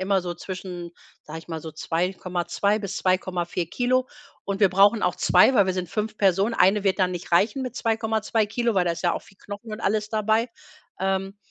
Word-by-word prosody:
immer 190 0 +1
so 175 -1 -4
zwischen, 180 -1 -7 0.3
sage 160 +1 -8
ich 165 - -20
mal, 160 -1 -4
so 160 0 -7
2,2 180 +4 -1
bis 200 -2 -5
2,4 180 -2 -1
Kilo. 255 +1 +1 0.4
Und 200 0 -3
wir 200 - +6
brauchen 200 +4 +4
auch 180 - +1
2, 185 +9 +5
weil 200 -5 +5
wir 185 - +1
sind 180 -2 -3
5 215 +3 -3
Personen. 195 +3 +2
Eine 200 +1 +4
wird 195 0 +1
dann 185 -1 +2
nicht 175 - -7
reichen 210 +9 +3
mit 250 -1 -6
2,2 220 -1 0
Kilogramm, 230 0 -1
weil 180 - +1
da 170 - +2
ist - - -7
ja 175 - +2
auch - - -5
viel 195 - -20
Knochen 205 +2 -9
und 215 - -6
alles 210 0 0
dabei. 220 +2 +1 0.5
Ähm, 195 +1 -1
195 Hz, 210 wpm, -24 LUFS, 180-215 Hz, 0.5 s, wir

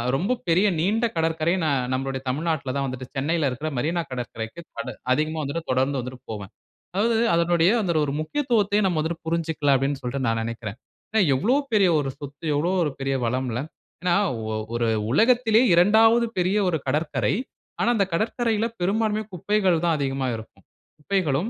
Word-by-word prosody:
ரொம்ப 200 - 0
பெரிய 180 +5 +4
நீண்ட 215 +8 +1
கடற்கரை 160 0 +1
ந - - +1 0.3
நம்மளுடைய 135 0 -2
தமிழ்நாட்டில 150 -1 -1
தான் 140 - 0
வந்துட்டு 130 0 -6
சென்னையில 150 +1 +1
இருக்கிற 145 +5 -4
மெரீனா 165 +7 0
கடற்கரைக்கு 120 +1 -5 0.2
தட 140 - -4 0.2
அதிகமா 155 +3 -1
வந்துட்டு 160 +4 -4
தொடர்ந்து 135 +2 +1
வந்துட்டு 125 +1 -8
போவேன். 100 -2 -7 0.4
அதாவது 225 +3 +2 0.2
அதனுடைய 170 0 +3
அந்த 180 -4 0
ஒரு 140 - -2
முக்கியத்துவத்தை 210 - +1
நம்ம 180 -4 +1
வந்துட்டு 160 +2 -3
புரிஞ்சுக்கல 160 -3 +1
அப்படீன்னு 135 +1 -1
சொல்ட்டு 130 +2 -2
நான் 115 0 +1
நெனைக்கிறேன். 115 -2 -5 0.4
அ - - +6 0.2
எவ்வளோ 240 - +2 0.2
பெரிய 200 -4 +5
ஒரு 135 -2 -2
சொத்து, 145 0 -10
எவ்வளோ 160 +5 +1
ஒரு 150 - -1
பெரிய 135 0 0
வளம்ல. 125 0 -1 0.4
ஏன்னா 180 -1 +3 0.4
ஒ - - -2 0.2
ஒரு 120 0 +1 0.3
உலகத்திலயே 235 - +4
2வது 225 +6 +5
பெரிய 180 +3 +1
ஒரு 165 - 0
கடற்கரை. 145 -8 0 0.5
ஆனா - - +3
அந்த 200 -3 +2
கடற்கரையில 225 +3 0 0.2
பெரும்பான்மையா 215 +3 0
குப்பைகள் 185 -2 +1
தான் 165 -2 +3
அதிகமா 135 -2 -1
இருக்கும். 110 0 -11 0.3
குப்பைகளும், 165 +1 0
160 Hz, 160 wpm, -24 LUFS, 135-195 Hz, 0.5 s, அ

